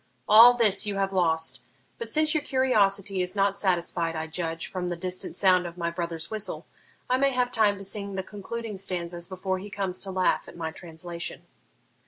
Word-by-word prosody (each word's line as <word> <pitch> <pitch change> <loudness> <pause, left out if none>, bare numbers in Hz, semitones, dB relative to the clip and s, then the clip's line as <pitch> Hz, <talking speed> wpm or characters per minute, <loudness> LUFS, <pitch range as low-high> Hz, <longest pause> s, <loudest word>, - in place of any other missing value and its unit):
All 230 +4 +9
this 215 -3 +3
you 205 - -2
have 195 0 -1
lost; 165 -3 0 0.4
but, 465 - -4
since 310 0 +3
your 310 - +1
curiosity 205 -8 +2
is 180 +2 -2
not 200 0 +2
satisfied, 170 -3 0
I 160 0 -3
judge, 165 0 -4
from 180 -1 -4
the 175 - -2
distant 180 +1 -3
sound 185 -2 +3
of 170 +1 -10
my 170 -1 -2
brother's 170 0 -5
whistle, 215 -1 -4 0.4
I 255 - +2
may 275 0 +2
have 250 0 +1
time 210 -3 +3
to 195 - -7
sing 200 0 -3
the 190 - -2
concluding 210 +2 -6
stanzas 175 -2 -3
before 185 0 -3
he 205 +2 -8
comes 195 -2 -3
to 195 - 0
laugh 185 -1 +1
at - - -12
my 160 -1 -3
translation.' 170 0 -6
190 Hz, 195 wpm, -26 LUFS, 175-210 Hz, 0.4 s, All